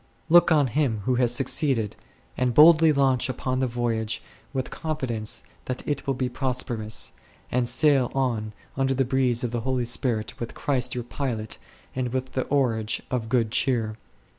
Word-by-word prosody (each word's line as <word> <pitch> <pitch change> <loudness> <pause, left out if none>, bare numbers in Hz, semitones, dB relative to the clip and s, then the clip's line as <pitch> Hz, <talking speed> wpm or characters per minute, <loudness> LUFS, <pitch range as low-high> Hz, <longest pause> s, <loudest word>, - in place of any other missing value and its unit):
Look 175 +1 +6
on 150 -3 +5
him 125 -4 0
who 130 - +2
has 120 -2 +2
suc 125 +2 +2
ceeded, 125 -9 +2 0.4
and 125 -2 0
boldly 160 +1 +8
launch 135 -3 +2
upon 130 0 -2
the 130 - +1
voyage 115 -2 -2 0.3
with 130 -2 -3
confidence 130 -9 -2 0.2
that 130 0 -5
it 145 0 -2
will 135 - +1
be 130 0 -1
prosperous, 120 -4 -2 0.4
and 125 -1 +1
sail 135 -1 +3
on 115 -5 -1 0.2
under 135 0 +1
the 135 0 +1
breeze 125 -2 +1
of 120 - -1
the 120 -1 -2
Holy 130 0 -1
Spirit 115 -2 -1
with 120 - -6
Christ 130 -4 0
your 120 - -3
pilot 115 -4 -4 0.4
and 125 -2 -2
with 130 0 -3
the 130 - -1
oarage 115 -6 0
of 120 -3 -2
good 115 -3 +1
cheer 120 -3 +1
9. 110 - -9
125 Hz, 175 wpm, -25 LUFS, 115-135 Hz, 0.4 s, boldly